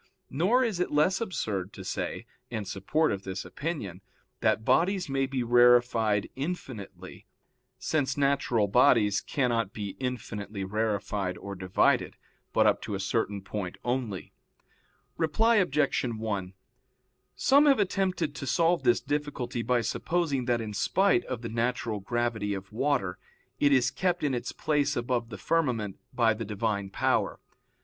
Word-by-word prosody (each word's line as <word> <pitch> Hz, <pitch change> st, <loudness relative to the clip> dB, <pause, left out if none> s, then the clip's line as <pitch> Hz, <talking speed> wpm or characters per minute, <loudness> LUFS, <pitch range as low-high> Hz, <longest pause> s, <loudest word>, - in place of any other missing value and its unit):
Nor 195 Hz, -, +3 dB
is 220 Hz, -7 st, -1 dB
it 180 Hz, -, 0 dB
less 155 Hz, +7 st, +2 dB
absurd 105 Hz, -, -3 dB
to 95 Hz, -, -9 dB
say, -, -, -4 dB, 0.2 s
in 110 Hz, -4 st, -4 dB
support 100 Hz, +12 st, 0 dB
of 100 Hz, -, -3 dB
this 95 Hz, 0 st, -5 dB
opinion, 140 Hz, -, -5 dB, 0.4 s
that 110 Hz, -, +1 dB
bodies 180 Hz, +8 st, +2 dB
may 135 Hz, -1 st, 0 dB
be 130 Hz, -2 st, -2 dB
rarefied 120 Hz, -3 st, +4 dB
infinitely, 135 Hz, -, -6 dB, 0.5 s
since 145 Hz, -4 st, -1 dB
natural 135 Hz, -6 st, +2 dB
bodies 105 Hz, -2 st, +4 dB
cannot 115 Hz, -7 st, 0 dB
be 105 Hz, -2 st, -4 dB
infinitely 105 Hz, -6 st, -4 dB
rarefied 100 Hz, -2 st, -1 dB
or 100 Hz, -, -7 dB
divided, 95 Hz, -1 st, +1 dB, 0.3 s
but -, -, +3 dB
up -, -, +3 dB
to 105 Hz, -, -4 dB
a -, -, -4 dB
certain 100 Hz, -1 st, -1 dB
point 100 Hz, -3 st, -5 dB
only. 120 Hz, -6 st, -3 dB, 0.8 s
Reply 225 Hz, +9 st, +3 dB
Obj. 150 Hz, -7 st, +2 dB
1: 110 Hz, -6 st, -3 dB, 0.8 s
Some 280 Hz, +2 st, +5 dB
have 275 Hz, -5 st, +5 dB
attempted 190 Hz, -6 st, 0 dB
to 135 Hz, -1 st, -6 dB
solve 170 Hz, +5 st, +2 dB
this 120 Hz, -, +3 dB
difficulty 140 Hz, -3 st, -3 dB
by 125 Hz, 0 st, +1 dB
supposing 145 Hz, +2 st, -1 dB
that 120 Hz, -1 st, +1 dB
in 110 Hz, -2 st, -5 dB
spite 185 Hz, -, +2 dB
of 125 Hz, -2 st, -5 dB
the -, -, -3 dB
natural 115 Hz, -1 st, -1 dB
gravity 110 Hz, -1 st, -1 dB
of 95 Hz, +2 st, -8 dB
water, 120 Hz, -7 st, 0 dB, 0.4 s
it 145 Hz, -, +4 dB
is 130 Hz, -1 st, +4 dB
kept 180 Hz, -3 st, -1 dB
in 145 Hz, -3 st, +1 dB
its 120 Hz, -, -3 dB
place 145 Hz, -2 st, 0 dB
above 120 Hz, -1 st, -1 dB
the 105 Hz, -, -7 dB
firmament 120 Hz, -, -1 dB
by 115 Hz, -2 st, +3 dB
the 110 Hz, +2 st, -5 dB
Divine 105 Hz, -1 st, -2 dB
power. -, -, 0 dB
120 Hz, 145 wpm, -28 LUFS, 105-145 Hz, 0.8 s, Some